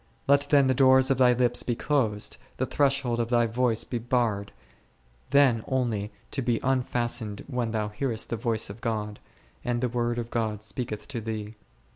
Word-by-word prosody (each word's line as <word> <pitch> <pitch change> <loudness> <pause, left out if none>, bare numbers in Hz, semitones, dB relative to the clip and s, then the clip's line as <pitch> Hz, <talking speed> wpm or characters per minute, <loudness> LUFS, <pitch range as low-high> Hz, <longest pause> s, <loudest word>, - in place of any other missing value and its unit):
Let 140 +1 +4
then 140 -2 +5
the 130 - +3
doors 130 +1 +5
of 135 - +1
thy 125 -1 +6
lips 120 0 +1
be 120 - -1
closed, 115 -7 0 0.2
the 130 - 0
threshold 135 -4 +1
of 115 -1 -1
thy 120 -1 +3
voice 115 0 +1
be 120 - -4
barred, 115 -4 0 0.8
then 130 -5 +4
only 115 -6 -1 0.2
to 135 - -2
be 120 -2 0
unfastened 120 -5 -1
when 125 -4 -2
thou 110 -1 -1
hearest 110 +1 -3
the - - +1
voice 115 -1 0
of 110 +3 -12
God, 105 -3 -3 0.4
and 120 -1 -1
the 125 0 0
Word 120 0 -1
of 120 -1 -4
God 110 -2 -2
speaketh 110 -1 -5
to 120 -5 -3
thee. 110 -1 -5
120 Hz, 180 wpm, -27 LUFS, 110-130 Hz, 0.8 s, thy